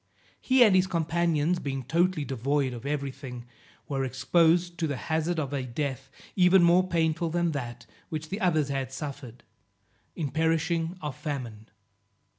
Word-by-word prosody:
He 260 -1 +5
and 210 -5 +5
his 185 0 +4
companions 170 -1 +1
being 135 -3 -4
totally 165 +3 +1
devoid 135 +1 0
of 120 +3 -7
every 140 -2 -2
thing, 125 -3 -9 0.4
were 135 -2 -1
exposed 170 +6 +2
to 160 - +1
the 140 -3 -3
hazard 160 +3 -1
of 145 -2 -3
a 140 - -1
death 135 +1 -4 0.3
even 185 -1 +5
more 175 +2 +5
painful 165 -1 0
than 170 0 0
that 120 -4 -5 0.2
which 155 0 -5
the 195 - -3
others 155 -6 +2
had 135 -2 -2
suffered, 135 -4 -7 0.7
in 150 -6 -3
perishing 165 +2 0
of 150 -3 -4
famine. 120 -9 -6
155 Hz, 155 wpm, -27 LUFS, 135-170 Hz, 0.7 s, He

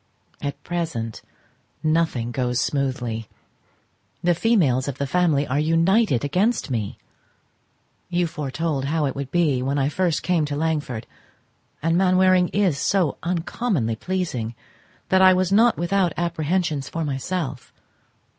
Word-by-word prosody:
At 145 -1 -5
present, 160 -11 -3 0.6
nothing 155 -7 +1
goes 125 0 -1
smoothly; 125 -5 -2 0.9
the 175 0 +4
females 160 - +2
of 140 -2 -4
the 140 - -1
family 150 -1 +2
are 140 +2 0
united 165 - +2
against 185 - 0
me. 110 -5 -2 1.1
You 175 0 +1
foretold 150 -2 -2
how 155 +1 0
it 135 - -2
would 140 -1 -4
be 150 -7 +2
when 135 +3 -1
I 140 0 +1
first 175 +1 0
came 175 -3 +2
to 145 -1 -3
Langford, 145 -7 -2 0.8
and 165 +2 +2
Mainwaring 185 -1 +4
is 185 -8 +1
so 180 -4 +1
uncommonly 170 - -1
pleasing 130 -8 -3 0.5
that 190 0 +4
I 185 -1 +7
was 185 0 +1
not 225 +4 +4
without 175 0 +1
apprehensions 165 -3 -1
for 165 -1 -3
myself. 140 -1 -3
160 Hz, 130 wpm, -23 LUFS, 135-180 Hz, 1.1 s, I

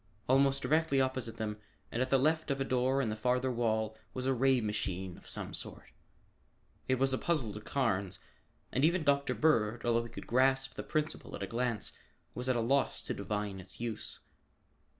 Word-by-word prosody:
Almost 135 +1 +4
directly 155 +1 +3
opposite 130 -3 -1
them 105 -1 -3 0.3
and 120 - -1
at 130 - +1
the 135 - +5
left 155 +4 +2
of 140 0 0
a - - +2
door 130 +1 +2
in 115 - 0
the 110 - -2
farther 125 +3 +1
wall 110 -2 0 0.2
was 130 0 -3
a 135 - +3
ray 130 +1 +4
machine 95 -4 -2
of - - -13
some - - -4
sort. - - -7 1.0
It 130 - +3
was 135 +1 +2
a 130 - 0
puzzle 140 -11 0
to 105 - -7
Carnes, 100 -7 0 0.5
and 130 - +1
even 170 +2 +4
Dr. 140 -1 +2
Bird, 120 -7 +2
although 115 0 +2
he - - -8
could - - -8
grasp 135 +2 +3
the - - -5
principle 155 0 -2
at - - -5
a - - 0
glance, 120 -2 -1 0.4
was 125 +1 -3
at 130 - +3
a 120 - +1
loss 135 +4 +1
to - - -2
divine 105 -2 -3
its 95 0 -9
use. 115 -2 -4
125 Hz, 195 wpm, -33 LUFS, 110-135 Hz, 1.0 s, the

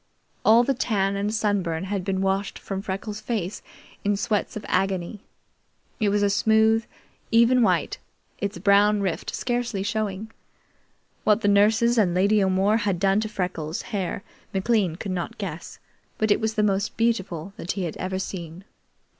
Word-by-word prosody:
All 230 +2 +6
the 275 - +1
tan 200 -6 0
and 200 +1 -1
sunburn 195 -6 0
had 195 0 -3
been 190 0 -1
washed 195 +1 -1
from 195 -1 -5
Freckles' 205 +2 -5
face 210 -4 -3 0.4
in 205 0 +1
sweats 215 -1 -1
of 210 - -8
agony. 190 +1 -1 0.8
It 215 -3 +2
was 205 0 +1
a 200 - +3
smooth, 220 +2 +3 0.4
even 235 +2 +5
white, 225 - +1 0.4
its 200 -2 -3
brown 205 +2 +4
rift 190 -4 -2
scarcely 240 -5 -2
showing. 215 0 -3 0.9
What 215 +1 +3
the 205 - +1
nurses 220 +4 +4
and 180 -5 +2
Lady 200 +2 +3
O'More 190 +3 +2
had 205 -5 0
done 195 +2 +3
to 215 0 -2
Freckles' 180 -5 -3
hair 195 -1 -2 0.3
McLean 195 -4 +1
could 195 +2 -5
not 180 -2 -4
guess, - - -6 0.4
but 215 -1 +1
it - - +4
was 220 0 -1
the 215 - +2
most 200 0 0
beautiful 195 -6 -1
that 175 - -3
he 190 -3 -3
ever 185 +3 -4
had 190 - -1
seen. 170 -1 -7
200 Hz, 165 wpm, -24 LUFS, 190-220 Hz, 0.9 s, All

